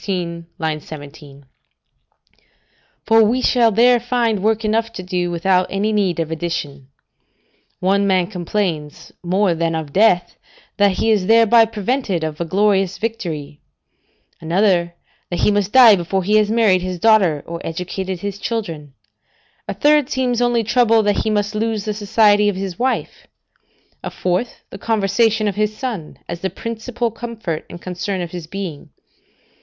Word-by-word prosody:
16, 170 -3 -4 0.3
17.] 145 -2 -12 1.6
for 225 0 +5
we 235 +4 +2
shall 240 -2 +3
there 240 +3 +4
find 235 -4 0
work 220 +1 0
enough 225 +1 0
to 190 -5 -8
do, 180 -1 -2
without 180 +2 +1
any 205 +3 -1
need 195 -5 0
of 165 -1 -2
addition. 155 -5 -4 0.9
One 200 +2 +1
man 185 -2 +2
complains, 175 -5 -4
more 185 +1 +1
than 165 0 -1
of 155 -3 -5
death, 190 -4 +2 0.4
that 200 -2 +3
he 225 +4 +1
is 200 -4 +1
thereby 230 0 +6
prevented 215 -4 -2
of 155 0 -4
a - - -1
glorious 195 +1 +1
victory; 160 -10 -5 0.8
another, 175 0 +1 0.3
that 175 - -3
he - - +3
must 205 -1 0
die 240 -4 +8
before 185 +1 -2
he 210 +4 +3
has 210 -1 +2
married 215 -5 +3
his 185 0 -4
daughter, 185 -7 +3
or 170 0 -7
educated 180 +2 -5
his 200 -1 -5
children; 165 - -5 0.7
a - - -4
third 295 -2 +3
seems 250 -3 0
only 240 -1 +2
troubled 230 -1 +3
that 205 -1 +1
he - - 0
must 210 0 -1
lose 220 -1 -2
the 215 - -2
society 210 0 +3
of 205 - -2
his 190 -2 -5
wife; 260 +1 -2 0.8
a - - -3
fourth, 185 +7 -2
the - - -9
conversation 220 0 +1
of 205 - 0
his 215 +1 -1
son, 220 - -5
as 170 - -5
the 190 - -1
principal 230 +4 -4
comfort 225 -8 -6
and 175 - -11
concern 185 +2 -4
of 175 -2 -5
his 175 -3 -7
being. 180 -5 -7
200 Hz, 155 wpm, -19 LUFS, 175-225 Hz, 1.6 s, die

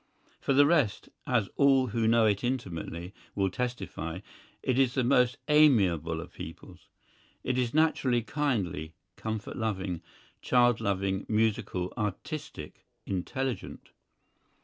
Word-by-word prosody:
For 140 - 0
the 145 +2 +6
rest, 145 -9 +2 0.2
as 115 -6 +2
all 135 -2 +5
who 110 +1 0
know 115 0 +5
it 100 -2 +1
intimately 90 -7 -4 0.2
will 95 -2 +1
testify, 95 -8 -4 0.4
it 130 0 +1
is 130 -2 +3
the 130 - +2
most 125 -1 +3
amiable 95 - +4
of - - -11
peoples. - - -10 0.6
It 130 - 0
is 120 -2 0
naturally 140 -6 +2
kindly, 100 - -2 0.2
comfort 110 -1 -5
loving, 95 -6 -2 0.4
child 120 -2 +3
loving, 95 0 -1
musical, 105 -4 0
artistic, 105 - -5 0.2
intelligent. 125 +7 -4
115 Hz, 120 wpm, -29 LUFS, 95-130 Hz, 0.6 s, the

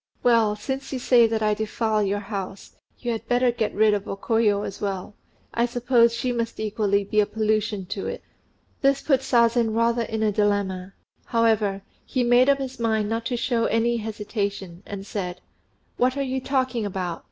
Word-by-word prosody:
"Well, 230 -3 +4
since 265 +6 -5
you 265 - -2
say 245 -2 +5
that 220 -1 -1
I 210 0 +3
defile 220 0 -1
your 205 0 0
house, 195 -2 -6 0.2
you 240 - -3
had 225 - -4
better 245 0 +3
get 230 -3 -1
rid 215 0 +3
of 205 -1 -2
O 195 - -4
Koyo 210 -1 +1
as 195 - -6
well. 195 -1 -3 0.4
I 235 +1 +2
suppose 240 -1 +3
she 250 +2 -1
must 230 -1 -3
equally 210 -2 0
be 210 +2 0
a 205 - +3
pollution 215 -2 -1
to 195 - -5
it." - - -5 0.6
This 275 0 +2
put 270 -4 +3
Sazen 235 -3 +2
rather 230 +1 +2
in 220 -1 -2
a 215 - +2
dilemma; 195 -2 0 0.3
however, 215 -4 +1 0.2
he 255 - -1
made 245 +2 +5
up 280 - +5
his 265 -2 -6
mind 220 -2 0
not 225 +1 -2
to 245 - -2
show 235 -1 0
any 235 +1 +1
hesitation, 205 -4 -4
and 200 -1 -6
said, 180 -3 -4 0.6
"What 255 +2 +2
are 280 - 0
you 265 0 -2
talking 255 -3 0
about? 185 -4 -3
220 Hz, 185 wpm, -24 LUFS, 205-240 Hz, 0.6 s, say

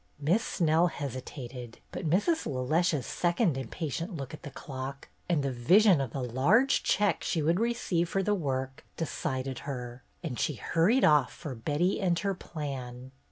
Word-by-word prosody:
Miss 170 +10 +2
Snell 165 0 +2
hesitated, 130 -4 -6
but 165 - -3
Mrs. 265 - +2
LeLeche's 150 +3 +1
second 175 - +1
impatient 160 - -4
look 135 -1 -6
at 155 - -8
the - - -7
clock, 135 0 -7 0.2
and 160 -5 +2
the 135 - 0
vision 175 - +5
of 135 - -2
the 135 +2 -4
large 170 - +3
check 205 -1 +1
she 160 -4 0
would 165 +4 +2
receive 220 -7 0
for 195 +2 0
the 210 - +2
work, 135 -4 -2
decided 130 -5 -3
her, 125 -2 -5 0.2
and 130 -9 -4
she 150 - 0
hurried 175 - +2
off 150 -4 +4
for 150 -5 -7
Betty 150 - 0
and 175 -3 +2
her 200 +1 0
plan. 130 -7 -6
150 Hz, 160 wpm, -29 LUFS, 130-175 Hz, 0.2 s, vision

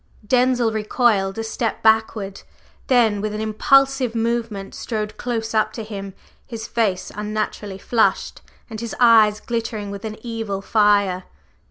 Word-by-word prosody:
/Denzil/ 245 -1 +2
recoiled 215 -2 +1
a 225 - -2
step 225 0 -3
backward, 220 -3 +1 0.5
then 225 -5 +3
with 210 0 -3
an - - -4
impulsive 260 +3 +2
movement 230 -3 -2
strode 215 -2 -4
close 225 -2 -3
up 215 -1 +2
to 225 - -5
him, 200 -3 -7 0.3
his 230 -2 -6
face 200 -6 -1
unnaturally 210 -1 -4
flushed 225 +3 0 0.3
and 220 -2 -7
his 235 - -5
eyes 220 -3 +6
glittering 225 -4 -4
with 200 0 -7
an 215 -1 -5
evil 225 -4 -3
fire. 200 -3 +2
220 Hz, 140 wpm, -21 LUFS, 205-230 Hz, 0.5 s, eyes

